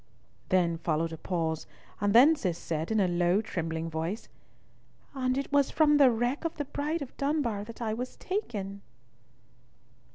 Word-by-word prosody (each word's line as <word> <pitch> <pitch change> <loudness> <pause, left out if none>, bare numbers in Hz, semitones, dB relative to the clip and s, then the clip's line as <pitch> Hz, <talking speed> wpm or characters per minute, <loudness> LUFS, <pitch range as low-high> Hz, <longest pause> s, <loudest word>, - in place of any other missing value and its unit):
Then 170 -3 +2
followed 165 0 -1
a - - -6
pause, 160 -3 -2 0.3
and 205 -1 +1
then 265 +9 +7
Cis 180 - -2
said 160 -1 -3
in 220 -1 +2
a 190 - +3
low 175 +2 +2
trembling 165 -6 -3
voice, 165 +7 -4 0.8
"And 255 -1 0
it 275 - -3
was 285 -1 +3
from 300 -2 +4
the 275 -3 +7
wreck 240 +5 0
of 330 0 -3
the 290 - -2
Bride 295 +3 -2
of 260 - -12
Dunbar 275 -8 0
that 230 +2 -8
I 220 -1 -1
was 250 +3 -5
taken?" 205 - -4
220 Hz, 165 wpm, -29 LUFS, 175-275 Hz, 0.8 s, then